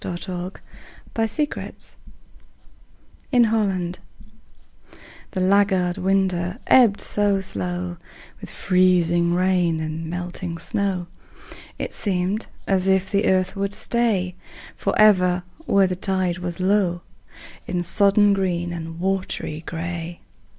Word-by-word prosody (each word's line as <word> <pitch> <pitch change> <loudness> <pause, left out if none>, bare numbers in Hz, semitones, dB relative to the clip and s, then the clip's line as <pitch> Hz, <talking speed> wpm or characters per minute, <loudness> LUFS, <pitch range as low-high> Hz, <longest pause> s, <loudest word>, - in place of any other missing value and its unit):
FLOOD 175 -1 -4
TIDE 180 0 -6 0.5
OF 225 -1 +1
FLOWERS 295 - -7 1.4
IN 245 -3 +5
HOLLAND 195 -6 0 1.3
The - - -4
laggard 190 -1 +2
winter 185 -1 0
ebbed 235 -6 +5
so 205 -1 +2
slow 180 -2 -3 0.4
With - - -8
freezing 175 -2 +2
rain 180 -3 +2
and 160 +1 -4
melting 175 0 -5
snow, 185 +1 -2 0.7
It - - -4
seemed 195 +2 -1 0.2
as 190 -1 +1
if 190 0 +2
the 200 +1 +2
earth 185 +1 +1
would 200 0 -2
stay 205 -6 0 0.4
Forever 180 -4 +3 0.2
where 200 -1 +4
the 185 -1 -1
tide 185 -1 -1
was 175 -1 -4
low, 185 -2 +1 0.7
In 175 -1 -1
sodden 200 +3 +4
green 175 -3 -1
and 165 0 -6
watery 185 -4 -2
gray. 170 0 -5
185 Hz, 110 wpm, -22 LUFS, 175-195 Hz, 1.4 s, IN